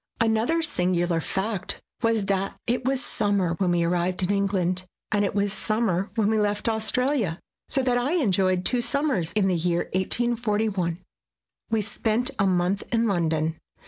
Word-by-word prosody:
Another 230 +9 +2
singular 180 - 0
fact 195 +3 -3 0.2
was 225 -3 +1
that 195 0 -1
it 245 +2 0
was 265 +1 -1
summer 200 -5 0
when 185 -2 +2
we 175 -1 +2
arrived 180 +2 0
in 180 - +1
England, 185 -2 0 0.2
and 205 -1 +2
it 200 - -1
was 200 -1 +1
summer 210 -2 0
when 220 -3 +2
we 220 0 +2
left 205 0 0
Australia; 225 - 0 0.3
so 270 - +1
that 245 -1 +2
I 265 +6 0
enjoyed 185 - +2
two 245 -1 +3
summers 260 - +1
in 205 -3 +2
the 185 - +2
year 175 0 0
1841. 210 -3 0 0.7
We 225 -2 +1
spent 220 +3 -1
a 195 - +3
month 180 +1 +1
in 230 -1 +2
London. 160 -5 0
200 Hz, 160 wpm, -25 LUFS, 180-230 Hz, 0.7 s, two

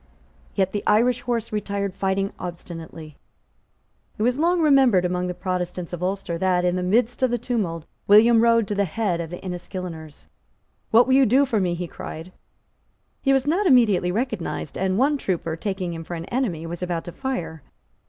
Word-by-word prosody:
Yet 190 -1 +1
the 205 - -2
Irish 240 +3 +3
horse 235 -3 -2
retired 200 -2 -2
fighting 195 0 -1
obstinately. 165 -3 -8 1.0
It 215 - -1
was 250 +4 +1
long 345 +2 +2
remembered 270 - +4
among 180 0 -1
the 180 - -4
Protestants 180 -1 -4
of 175 - -5
Ulster 185 -2 -2
that, 180 -1 +2
in 180 0 +1
the 180 - -1
midst 225 +7 +1
of 260 - +3
the 240 - 0
tumult, 185 -11 -2 0.2
William 225 +3 +6
rode 230 -2 +4
to - - 0
the 200 0 +1
head 180 -1 -1
of 165 - -6
the 175 - -6
Enniskilleners. 175 -4 -7 0.6
"What 230 +2 +6
will 260 - +1
you 270 0 +5
do 265 +6 +4
for 230 -5 0
me?" 180 -3 0
he 175 0 -4
cried. 165 +2 -8 0.9
He 275 - +2
was 270 -1 +2
not 360 +7 +1
immediately 215 - +4
recognised; 215 - -3
and 190 0 0
one 280 +4 +2
trooper, 165 -6 -2
taking 185 0 -3
him 165 0 -6
for 175 - -6
an 165 0 -6
enemy, 195 -10 -2
was 170 +1 -6
about 175 -2 -2
to 175 - -8
fire. 170 - -4
190 Hz, 185 wpm, -23 LUFS, 175-235 Hz, 1.0 s, William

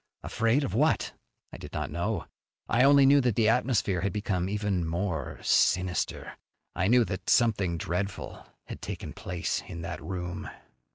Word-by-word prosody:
Afraid 115 +6 +1
of 100 - -3
what? 150 +8 +1 0.4
I - - -7
did - - -10
not - - -3
know. - - -2 0.4
I 120 +2 +3
only 140 0 +7
knew 140 +1 +6
that 125 -5 +1
the 110 -1 +3
atmosphere 115 -6 +1
had 100 +1 0
become 95 -2 -1
even 105 -3 -1
more 85 0 -3
sinister. 90 -2 +1 0.4
I 95 - +1
knew 120 +1 +5
that 95 -3 -5
something 100 -7 +3
dreadful 90 +4 -4 0.2
had - - -8
taken - - -6
place 90 -2 -3
in 85 0 -7
that 85 -1 -5
room. 90 -2 -5
100 Hz, 160 wpm, -28 LUFS, 90-120 Hz, 0.4 s, only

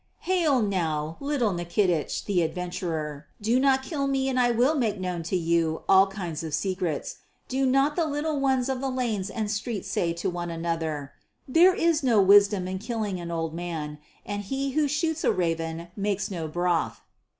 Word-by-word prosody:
"Hail 325 -9 +2
now, 160 -6 -1
little 280 -6 0
Nikitich, 175 -1 0
the 190 -4 +1
adventurer. 160 -3 -3
Do 225 +4 +2
not 265 0 +3
kill 280 -1 -2
me 270 -1 +1
and 255 -1 0
I 245 -1 +4
will 245 +5 +3
make 225 -9 0
known 180 -2 -3
to 165 +3 -2
you 165 -1 0
all 195 0 +6
kinds 180 -5 -5
of 155 -2 -2
secrets. 180 -4 -2 0.3
Do 265 +1 +1
not 275 +3 +3
the 335 - +1
little 295 0 -1
ones 265 -2 +2
of 265 -1 -2
the 270 - -1
lanes 230 -7 -1
and 215 0 -2
streets 215 -1 -3
say 170 - 0
to 170 +3 -3
one 175 -1 -3
another, 165 -4 -3 0.4
'There 350 +7 +5
is 330 -2 +2
no 240 -6 +3
wisdom 200 -1 +5
in 190 0 -3
killing 215 -4 -3
an 170 -1 -6
old 165 -1 -2
man, 160 -3 -5 0.3
and 205 0 -3
he 270 +6 -2
who 300 +2 +2
shoots 320 +2 -1
a - - +4
raven 165 -1 -2
makes 205 0 -1
no 165 -4 -3
broth.' 175 +1 -1
200 Hz, 185 wpm, -26 LUFS, 170-265 Hz, 0.4 s, all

